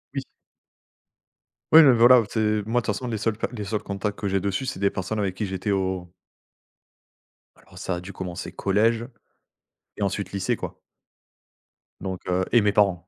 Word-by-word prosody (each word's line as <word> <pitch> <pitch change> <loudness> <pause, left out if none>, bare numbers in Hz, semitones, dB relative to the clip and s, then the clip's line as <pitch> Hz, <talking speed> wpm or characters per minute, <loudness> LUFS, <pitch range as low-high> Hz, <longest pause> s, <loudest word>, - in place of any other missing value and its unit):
Oui. 135 - -1 1.5
Oui, 160 0 +10
mais 135 -3 +7
voilà. 120 +2 +7
Où 110 - 0
tu 110 +2 -3
es 105 -1 +1
moi, 120 +3 0
de - - -12
toute 105 - 0
façon, 125 - -5
les 110 -3 -3
seuls 110 0 -1
cas - - -1
les 105 -4 -5
seuls 105 +1 -3
contacts 100 +1 -3
que 100 - -3
j'ai 95 0 +1
dessus, 100 +7 -2
c'est 130 - -4
des 100 0 +3
personnes 95 +3 -3
avec 95 -2 -1
qui 105 - -2
j'étais 95 +1 -4
au 95 -3 -1 1.4
Alors, 90 - -19
ça 95 -2 -2
a 85 - -5
dû 95 +2 -8
commencer 90 -2 -6
collège 115 +4 +1 0.9
et - - -7
ensuite 100 -1 -2
lycée, 100 -2 -1
quoi. - - -7 1.2
Donc 95 -1 -4
heu, 90 0 +1
et 120 -2 +5
mes 105 0 +3
parents. 95 -4 +2
100 Hz, 195 wpm, -24 LUFS, 95-110 Hz, 1.5 s, Oui